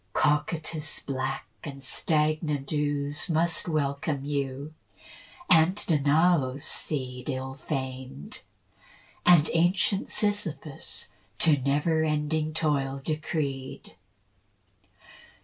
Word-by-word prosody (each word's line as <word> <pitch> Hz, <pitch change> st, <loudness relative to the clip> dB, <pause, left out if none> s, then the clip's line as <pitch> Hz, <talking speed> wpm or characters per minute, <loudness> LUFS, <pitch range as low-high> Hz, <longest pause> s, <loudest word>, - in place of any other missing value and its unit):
Cocytus' 155 Hz, 0 st, 0 dB
black 135 Hz, 0 st, -2 dB, 0.2 s
and 140 Hz, -2 st, -7 dB
stagnant 150 Hz, -1 st, 0 dB
ooze 145 Hz, 0 st, -1 dB
Must 165 Hz, +1 st, +2 dB
welcome 140 Hz, -2 st, -1 dB
you, 140 Hz, +1 st, -3 dB, 0.7 s
and 165 Hz, +2 st, +5 dB
Danaus' 150 Hz, -4 st, +2 dB
seed 125 Hz, -4 st, -3 dB
Ill 130 Hz, 0 st, -3 dB
famed, 130 Hz, -, -5 dB, 0.9 s
and 170 Hz, -4 st, +7 dB
ancient 185 Hz, +4 st, +2 dB
Sisyphus 195 Hz, -8 st, -1 dB, 0.3 s
To 155 Hz, -3 st, +5 dB
never 150 Hz, +4 st, +1 dB
ending 155 Hz, 0 st, 0 dB
toil 140 Hz, -4 st, 0 dB
decreed. 150 Hz, -4 st, -3 dB
150 Hz, 80 wpm, -27 LUFS, 135-160 Hz, 0.9 s, and